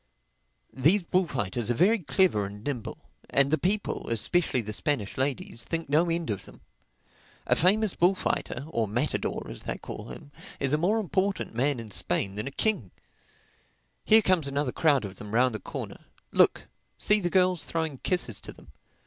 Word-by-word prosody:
These 165 +9 +3
bullfighters 130 - -1
are 120 - +2
very 215 - +4
clever 170 - +2
and 105 +1 -10
nimble. 130 -5 -4 0.3
And 140 0 +3
the 155 - +2
people, 200 +3 -1
especially 125 +4 +1
the 105 -1 -6
Spanish 115 -5 -2
ladies, 130 -3 -2
think 165 -3 -4
no 160 +4 +3
end 165 -6 -1
of 100 - -4
them. - - -15 0.8
A - - +3
famous 205 +3 +3
bullfighter 175 -7 0
(or 115 -8 0
matador, 120 +8 -2
as - - -9
they - - -4
call 105 - -8
them) 145 +5 -10 0.3
is 135 0 0
a 150 - +3
more 195 +7 +2
important 195 - -1
man 130 +3 0
in 110 -2 -9
Spain 95 +1 -1
than 105 +5 -4
a - - -4 1.6
king—Here 220 0 +8
comes 180 -7 +2
another 140 -1 -1
crowd 145 -7 +2
of 95 -1 -8
them 105 +1 -6
round 125 0 +3
the 110 - -4
corner, - - -7 0.3
look. - - +4 0.3
See 210 0 +3
the 175 -3 -1
girls 180 -3 +2
throwing 160 -5 -3
kisses 150 - -1
to - - -8
them. - - -17
145 Hz, 170 wpm, -27 LUFS, 115-180 Hz, 1.6 s, king—Here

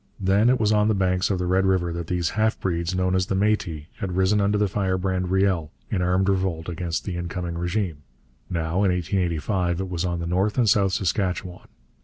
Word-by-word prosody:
Then 100 +4 +3
it 130 0 +3
was 105 -1 +2
on 105 0 +3
the 110 - +2
banks 95 0 +1
of 95 - +1
the 90 - -2
Red 95 +2 +2
River 90 -3 +1
that 85 -1 -5
these 90 -2 0
half 110 +1 0
breeds, 85 -1 -1
known 90 0 +1
as 95 0 +1
Métis, 95 -6 0
had 90 -2 -4
risen 95 +2 +3
under 100 +1 +2
the 105 0 +2
firebrand 95 -1 -1
Riel 95 -4 +1 0.2
in 95 - 0
armed 90 +2 +2
revolt 95 -4 0
against 85 -1 -3
the 95 - -3
incoming 85 0 -4
régime. 85 0 -2 0.5
Now, 85 +2 -1
in 100 - +3
1885, 90 0 0
it 95 - -4
was 85 -1 -2
on 90 -1 -1
the 85 - -3
North 95 +6 0
and 120 -3 +3
South 100 -2 +3
Saskatchewan. 90 -2 -2
95 Hz, 205 wpm, -24 LUFS, 85-100 Hz, 0.5 s, Then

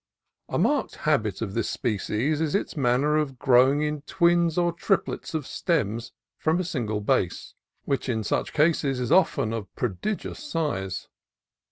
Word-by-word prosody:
A - - -1
marked 290 -2 +1
habit 115 -10 +1
of 100 -3 -5
the 115 - 0
species 120 +6 -1
is 160 0 0
its 200 - -1
manner 140 +2 +2
of 140 -4 -1
growing 130 +4 +4
in 150 -1 -2
twins 170 +2 +2
or 175 -1 +3
triplets 180 -1 -1
of 155 -4 -2
stems 115 - -1 0.3
from 160 +3 +1
a - - 0
single 115 -11 -2
base, 90 -3 0 0.3
which 140 -1 -1
in 110 -3 0
such - - -1
cases 150 -4 +2
is 125 -2 -2
often 160 -11 +3
of 110 -3 -5
prodi 125 - -1
gious - - -8
size. 150 - -3
140 Hz, 160 wpm, -26 LUFS, 115-165 Hz, 0.3 s, growing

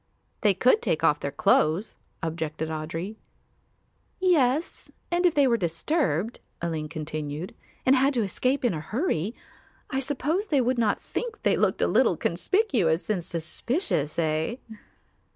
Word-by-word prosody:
"They 205 -3 +4
could 255 - +4
take - - 0
off - - +4
their - - -2
clothes," 160 +8 +2 0.3
objected 160 -1 -3
Audry. 165 +6 -4 1.0
"Yes, 315 -5 +1 0.2
and 350 +1 +3
if 345 - 0
they 285 -1 +5
were 235 -3 +3
disturbed," 180 - -1 0.2
Aline 160 -3 -3
continued, 155 +1 -5 0.3
"and 260 - +6
had 270 +2 +3
to 235 - +2
escape 255 +7 0
in 240 - +2
a 155 - -4
hurry, 215 - -1 0.6
I 265 - 0
suppose 290 +9 -1
they 290 -6 +2
would 250 0 +1
not 215 -3 +2
think 465 -3 -5
they - - +3
looked - - +1
a - - +3
little - - +3
conspicuous 220 - +1
and 185 -5 -1
suspicious, 165 - -2
eh?" 160 +5 0
215 Hz, 145 wpm, -26 LUFS, -, 1.0 s, and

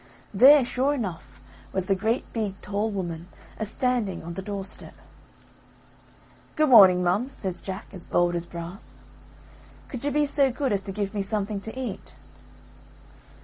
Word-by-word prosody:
There, 265 +6 +7
sure 265 +4 +1
enough, 170 - -6 0.3
was 190 -1 -1
the 195 - +2
great 220 +6 -1
big 205 -4 -3
tall 205 +2 -2
woman 175 -4 -5 0.3
a 220 - -1
standing 235 -5 -1
on 170 +1 -6
the 190 - -5
door 200 0 -5
step. 200 - -10 1.6
"Good 310 -1 +3
morning, 190 -7 +8
mum," 195 +9 +1
says 190 -9 -4
Jack, 190 +1 -6
as 180 -3 -6
bold 175 0 +2
as 170 0 -3
brass, 170 +4 -9 0.9
"could 250 -2 -6
you 290 - +1
be 295 +1 +2
so 280 -2 +2
good 260 -2 -1
as 200 - 0
to - - -2
give 200 +1 -3
me 205 - -1
something 205 0 -2
to 220 +5 -6
eat?" 240 -7 -6
205 Hz, 160 wpm, -25 LUFS, 185-250 Hz, 1.6 s, morning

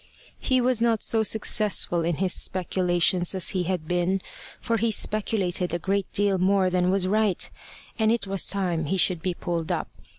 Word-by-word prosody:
He 260 -1 +1
was 245 -2 +1
not 230 -2 +1
so 225 - +2
successful 210 -5 +1
in 170 0 0
his 185 +2 0
speculations 180 0 +1
as 185 - +1
he 185 -3 -1
had 175 -3 -3
been, 180 +2 0 0.4
for 230 -1 -1
he 225 +1 0
speculated 195 -4 0
a - - 0
great 195 +2 -2
deal 200 -2 +1
more 190 0 +2
than 180 0 +1
was 190 -1 +1
right, 210 -1 +1 0.5
and 220 0 +3
it 230 -3 0
was 195 -1 -1
time 180 -5 -1
he 190 +6 -1
should 180 -2 +2
be 180 0 -2
pulled 170 -3 -3
up. - - -2
190 Hz, 185 wpm, -25 LUFS, 180-210 Hz, 0.5 s, and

